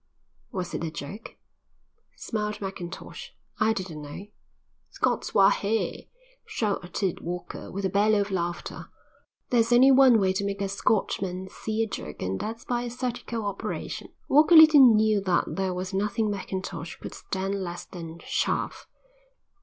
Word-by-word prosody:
"Was 185 -2 -4
it - - -3
a 165 - -1
joke?" 165 +7 -8 0.8
smiled 210 -2 -3
Mackintosh. 190 -3 -7 0.3
"I 220 +1 +3
didn't 185 -8 -4
know." 145 +7 -8 0.6
"Scots - - -1
wha 195 0 +7
hae!" 220 +2 -2 0.3
shouted 195 -3 -2
Walker, 180 +1 -6
with 195 +1 -3
a - - +1
bellow 210 +2 +3
of 200 0 -3
laughter. 175 -2 -4 0.6
"There's 235 -1 +3
only 255 +3 +7
one 260 -3 +7
way 190 -2 +2
to 195 - -1
make 200 0 -2
a 200 -1 -1
Scotchman 190 -2 -1
see 220 +1 -2
a - - -2
joke 75 - -6
and 95 +1 -2
that's 225 +2 -5
by 240 -1 -1
a 240 - -4
surgical 240 -2 -4
operation." 200 -1 -4 0.2
Walker 310 +4 +6
little 310 -3 +9
knew 215 -1 +3
that 185 -3 +2
there 190 -1 -1
was 180 +1 -4
nothing 210 +2 0
Mackintosh 190 -3 -5
could - - -8
stand 195 +1 -3
less 175 -1 -6
than 165 -2 -9
chaff. - - -1
200 Hz, 150 wpm, -26 LUFS, 185-225 Hz, 0.8 s, little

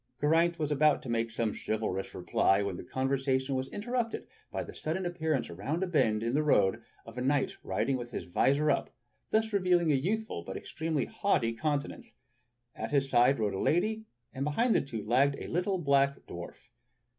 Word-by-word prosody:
Geraint 165 +3 +3
was 150 -2 -2
about 150 +1 +3
to 130 - -7
make 115 0 0
some 115 -2 -1
chivalrous 105 -3 -3
reply 95 +1 +2
when 100 -2 -2
the - - -7
con 130 +8 -2
versation 135 0 0
was 130 -1 -1
interrupted 235 +2 -2 0.3
by - - -2
the - - -10
sudden 170 +4 -3
appearance 160 -6 -1
around 135 - -3
a - - +2
bend 115 - +2
in 115 +1 -1
the 150 - +3
road 105 -11 +3 0.2
of 115 +2 -8
a - - -2
knight 135 +2 +1
riding 130 +3 0
with 120 -1 -6
his - - -5
visor 140 +11 +2
up, - - +1
and - - -27 0.4
thus 220 0 +1
revealing 180 -4 +3
a - - +4
youthful 195 - -1
but 95 +2 -6
extremely 160 -2 -2
haughty 200 - 0
countenance. 155 - -3 0.6
At 110 - -4
his 135 -2 +1
side 125 +3 +5
rode 105 -3 0
a 95 - -3
lady, 215 +7 +1 0.3
and 135 0 -3
behind 225 - +2
the - - +3
two 115 -7 -6
lagged 135 +5 +3
a - - -6
little 185 +3 0
black 140 -3 +2
dw^arf. 85 0 -8
140 Hz, 195 wpm, -30 LUFS, 115-170 Hz, 0.6 s, side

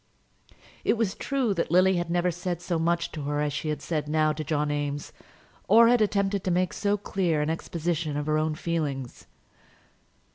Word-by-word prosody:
It - - +2
was 215 -4 0
true 265 -6 -1
that 170 - -1
Lily 185 +2 +4
had 175 -1 -2
never 175 +1 +1
said 175 0 -3
so 175 -1 -2
much 170 +1 0
to 155 - -6
her 145 0 -1
as 150 -1 0
she 145 +2 -3
had 150 -1 -3 0.2
now 155 0 +2
said 150 - -6
to 155 - -2
John 150 0 0
Eames, 145 0 -3 0.5
or 230 +3 +7
had 245 -1 +4
attempted 200 -2 +1
to - - +1
make 180 0 +1
so 205 0 0
clear 185 -5 -1
an 155 - 0
exposition 165 -2 -2
of 145 - -2
her 155 0 +1
own 155 0 0
feelings. 150 -7 -3
170 Hz, 190 wpm, -27 LUFS, 150-185 Hz, 0.5 s, or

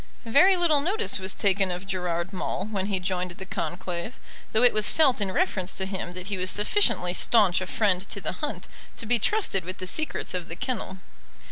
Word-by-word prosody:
Very 335 +12 +5
little 320 -5 +3
notice 395 - +1
was 190 0 -1
taken 195 -1 +2
of 180 +1 -4
Gerard 180 -1 -3
Maule 185 0 -3
when 195 -2 -2
he 195 -2 0
joined 180 0 -2
the 190 - -7
conclave, 175 +5 -5 0.3
though 220 - +3
it 245 - +6
was 215 -1 +3
felt 270 -8 +3
in 200 - +1
reference 190 -1 0
to 190 - -3
him 190 -2 -5
that 185 0 -7
he 200 0 -3
was 185 0 +1
sufficiently 205 - +2
staunch 195 -4 +3
a 185 - -4
friend 195 -3 0
to - - -3
the - - -1
hunt - - -5 0.3
to - - -5
be 240 +2 +2
trusted 295 - +1
with 185 +2 -6
the 185 - -6
secrets 310 +12 0
of 180 -2 -4
the 165 - -5
kennel. 230 -4 -4
190 Hz, 210 wpm, -26 LUFS, 180-230 Hz, 0.3 s, it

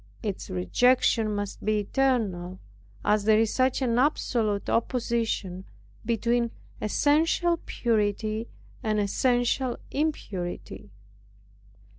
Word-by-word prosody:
Its 205 -4 -4
rejection 215 - +2
must 205 -1 -4
be 215 0 +1
eternal, 200 -7 0 0.5
as 210 0 +2
there 215 0 +5
is 220 -1 +2
such 260 +1 +1
an 240 -1 +2
absolute 230 -7 +1
opposition 230 -6 -1 0.4
between 235 +1 +1 0.3
essential 325 - +2
purity 215 0 0 0.3
and 215 -4 0
essential 245 +4 +1
impurity. 200 - -3
225 Hz, 90 wpm, -27 LUFS, 205-250 Hz, 0.5 s, there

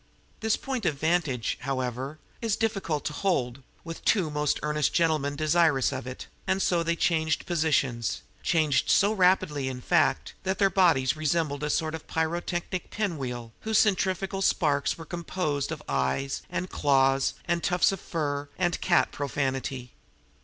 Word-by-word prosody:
This 220 -1 +1
point 255 -7 -3
of 145 - 0
vantage, 155 -6 0
however, 130 +2 -3 0.2
is 225 -3 0
rather - - -12
difficult 195 -10 -1
to 150 - -2
hold, 135 -8 -1 0.2
with 165 0 -8
two 180 -8 +2
most 150 -1 0
earnest 150 -1 0
gentlemen 155 -4 +2
desirous 155 -2 +3
of 125 - -5
it; 130 - -7 0.2
and 190 - +1
so 175 -3 +2
they 170 0 0
changed 160 -2 +1
positions 140 - 0 0.2
changed 155 -4 +2
so 200 +2 +4
rapidly, 180 -8 +2
in 130 -1 -4
fact, 155 +2 +1
that 190 0 -1
their 195 -1 +3
bodies 160 -9 +3
resembled 155 -2 0
a 150 - -1
sort 155 +1 0
of 160 - -7
pyrotechnic 175 +2 -2
pinwheel 130 - -3
whose 220 -1 0
centrifugal 195 -1 +1
sparks 150 -7 +1
were 165 - -9
composed 160 -4 -2
of - - -5
eyes 135 - -1
and 180 +1 -3
claws 135 -1 +2
and 170 0 0
tufts 180 +1 +3
of 195 - -4
fur 145 -4 -3
and 175 -2 0
cat 175 - +3
profanity. 135 -2 -3
155 Hz, 155 wpm, -27 LUFS, 140-180 Hz, 0.2 s, so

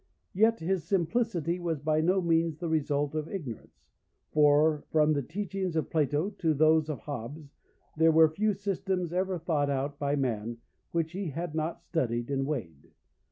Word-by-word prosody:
Yet 220 +2 +3
his 180 +1 0
simplicity 175 -1 0
was 165 -3 -2
by 155 +2 +1
no 185 +3 +2
means 165 -2 +1
the 170 +1 -4
result 145 -2 0
of 155 0 -3
ignorance, 125 - -8 0.4
for 150 0 +4
from 155 -1 +4
the 145 - 0
teachings 190 +3 -4
of 160 - -1
Plato 155 +4 +1
to 160 -3 +2
those 155 +1 +4
of 150 - -4
Hobbes 140 +2 -7 0.4
there 160 +1 +5
were 160 0 +7
few 210 +4 +1
systems 190 -3 -2
ever 185 0 0
thought 155 -4 0
out 140 +1 -2
by 145 0 0
man 120 -4 -2 0.3
which 165 -1 -1
he 190 -1 -4
had 165 +2 -4
not 160 +1 -3
studied 120 -6 -2
and 135 0 0
weighed. 85 - -5
155 Hz, 165 wpm, -29 LUFS, 145-175 Hz, 0.4 s, were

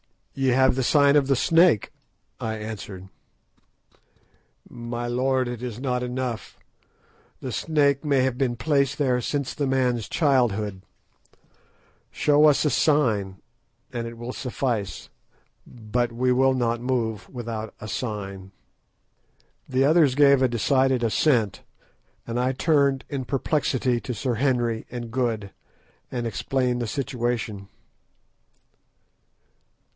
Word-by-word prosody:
"Ye 135 -1 -1
have 130 +1 +4
the 130 - -1
sign 140 +2 +4
of 140 -2 +4
the 135 - +3
snake," 165 - +3 0.5
I 110 -1 -3
answered. 105 -3 -7 1.6
"My 120 0 -5
lord, 130 +1 0
it 120 -1 -5
is 120 -2 -5
not 125 -2 -1
enough. 125 -2 -4 0.8
The 130 - -4
snake 140 -1 +1
may 140 -3 +2
have 130 -1 0
been 130 -3 0
placed 140 +2 +1
there 125 -4 +1
since 140 +2 -2
the 145 -2 -2
man's 125 -4 0
childhood. 110 - +1 1.3
Show 150 0 +3
us 150 0 +4
a 150 - +2
sign, 110 -11 +1 0.5
and 120 -1 -3
it 115 0 -9
will 120 +2 -6
suffice. 120 -6 -3 0.6
But 120 +1 -2
we 125 +2 +1
will 130 +1 +3
not 120 -2 0
move 115 -4 -2
without 115 -3 -6
a 110 - -7
sign." 100 -5 -5 1.2
The 130 +1 +2
others 150 -2 +4
gave 140 -2 +5
a 130 - +4
decided 130 +1 +1
assent, 115 -1 +1 0.6
and 120 +1 -3
I 130 +1 +1
turned 140 -2 +2
in 135 -3 -3
perplexity 130 -2 0
to 125 +1 -5
Sir 120 +4 -1
Henry 120 -3 0
and 120 -2 -6
Good, 115 -5 -1 0.6
and 120 -1 -3
explained 125 +1 -1
the 120 - -2
situation. 120 -6 -3
125 Hz, 125 wpm, -24 LUFS, 115-135 Hz, 1.6 s, gave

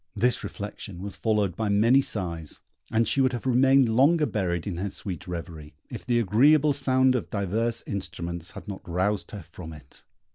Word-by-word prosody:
This 125 +1 +1
reflection 100 -3 -7
was 100 - -6
followed 105 -5 0
by 110 0 -2
many 115 +7 +4
sighs, 85 - -3 0.3
and 115 +1 +1
she 135 - +1
would 130 -1 +2
have 120 - -5
remained 130 +1 +4
longer 145 +8 +4
buried 90 - -2
in 95 -4 -4
her 100 +3 -2
sweet 95 -2 -6
reverie, 80 -4 -7 0.2
if - - -8
the 120 -1 +2
agreeable 140 +8 +4
sound 130 -2 +3
of 125 - -2
divers 110 +4 -1
instruments 85 -3 -4
had - - -10
not 100 -2 -6
roused 95 +1 -1
her 100 -4 -8
from 80 -1 -10
it. 75 -3 -15
105 Hz, 180 wpm, -26 LUFS, 90-125 Hz, 0.3 s, many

